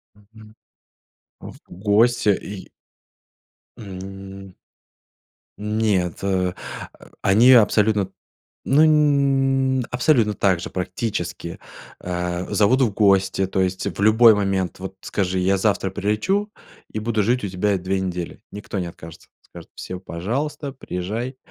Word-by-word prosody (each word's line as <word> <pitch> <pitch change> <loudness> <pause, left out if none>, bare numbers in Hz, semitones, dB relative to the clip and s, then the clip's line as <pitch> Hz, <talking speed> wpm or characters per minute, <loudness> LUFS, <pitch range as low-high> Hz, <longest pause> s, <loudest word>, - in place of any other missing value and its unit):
Мгм. 110 +1 -18 0.9
В - - -10
гости, 110 +4 +2
и 100 0 -4 1.1
М 95 -1 -9 1.0
Нет, 105 -5 0
э, 95 -2 0 0.7
они 115 +7 +6
абсолютно, 105 -4 +4 0.6
ну 135 -3 +3
абсолютно 125 -5 +2
также, 95 -4 0
практически, 90 -2 -4 0.4
э, 90 0 -3
зовут 125 +6 +3
в 115 -5 +3
гости. 95 -2 +3
То 95 0 -1
есть 95 +1 -1
в - - -3
любой 110 +1 +6
момент 95 -3 -1
вот 95 0 -7
скажи: 95 -2 -1
"Я 95 +2 +2
завтра 100 -1 0
прилечу 105 - -1 0.4
и 110 - -3
буду 110 -1 0
жить 120 +2 +1
у - - -1
тебя 95 +2 0
2 95 +1 -2
недели"- 90 -2 -5
никто 105 -1 -5
не 90 - -3
откажется. 80 -1 -12
Скажут: - - -14
"Всё, 90 0 -7
пожалуйста, 125 - -4
приезжай". 115 +4 -5
100 Hz, 115 wpm, -22 LUFS, 95-115 Hz, 1.1 s, они